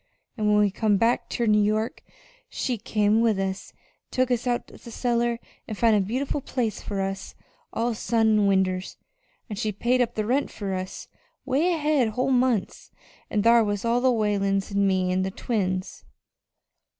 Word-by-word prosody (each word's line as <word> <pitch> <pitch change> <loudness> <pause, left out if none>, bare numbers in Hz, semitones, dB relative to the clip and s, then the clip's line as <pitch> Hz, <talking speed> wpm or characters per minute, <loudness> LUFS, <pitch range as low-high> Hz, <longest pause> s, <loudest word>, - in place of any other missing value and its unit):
An' 215 -3 -1
when 210 0 +4
we 205 -1 +3
come 210 0 +1
back 230 +3 +1
ter 235 - -1
New 210 -1 +4
York 215 +2 0 0.5
she 245 -4 -2
come 210 +1 +2
with 225 -3 +2
us 190 0 -3
an' - - -30 0.3
took 255 0 0
us 245 0 0
out 240 -1 -1
of - - -16
the - - -9
cellar 235 0 0 0.3
an' 215 - -4
found 225 +1 +3
a - - +4
beautiful 260 +8 -2
place 240 -5 -2
fur 200 -2 -3
us, 195 0 -4 0.4
all 235 +1 -1
sun 225 0 +1
an' 210 -2 +3
winders, 190 -1 0 0.5
an' 210 - -6
she 215 +1 -1
paid 240 +5 +1
up 240 - -1
the 215 - -1
rent 260 +6 +1
fur 200 -2 -5
us 185 0 -5 0.4
'way 285 +7 +2
ahead 300 -6 +2
whole 255 +5 -1
months. 250 -5 0 0.4
An' 210 - 0
thar 230 0 +6
was 205 0 -2
all 235 +1 +2
the 260 0 +4
Whalens 200 -3 0
an' 200 0 +2
me 185 -1 +1
an' 185 +1 +1
the 190 - -1
twins." 185 -3 -3
215 Hz, 185 wpm, -25 LUFS, 200-240 Hz, 0.5 s, thar